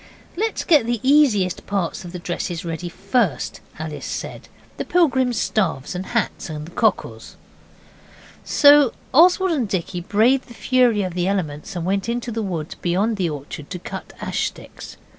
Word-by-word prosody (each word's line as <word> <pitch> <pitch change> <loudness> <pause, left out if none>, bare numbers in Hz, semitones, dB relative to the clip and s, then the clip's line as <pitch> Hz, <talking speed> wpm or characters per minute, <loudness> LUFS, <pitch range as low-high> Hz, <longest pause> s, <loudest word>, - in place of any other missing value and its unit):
'Let's 440 +5 -1
get 295 -9 +4
the 240 -1 0
easiest 260 - +3
parts 195 -4 -2
of 175 - -8
the 180 - -6
dresses 175 0 -4
ready 170 +1 -4
first.' 215 - -1 0.2
Alice 155 -1 -6
said - - -6 0.3
'the - - -3
pilgrims' 260 -9 +2
staffs 165 -10 -1
and 185 +1 -5
hats 230 -5 -2
and 150 -1 -5
the 170 - -12
cockles.' - - -1 1.1
So 285 -3 +6 0.2
Oswald 360 +5 +5
and 260 -10 0
Dicky 180 -1 -2
braved 235 +9 +2
the 235 - -13
fury 245 -6 +2
of 185 -2 -3
the 180 0 -1
elements 175 -4 -3
and 170 -1 -3
went 195 +4 -1
into 240 0 -2
the 225 0 -2
wood 170 -7 -4
beyond 200 +6 +1
the 180 -3 0
orchard 145 0 -7
to 180 - -4
cut 180 - -8
ash - - -1
sticks. - - -11
200 Hz, 165 wpm, -21 LUFS, 175-250 Hz, 1.1 s, So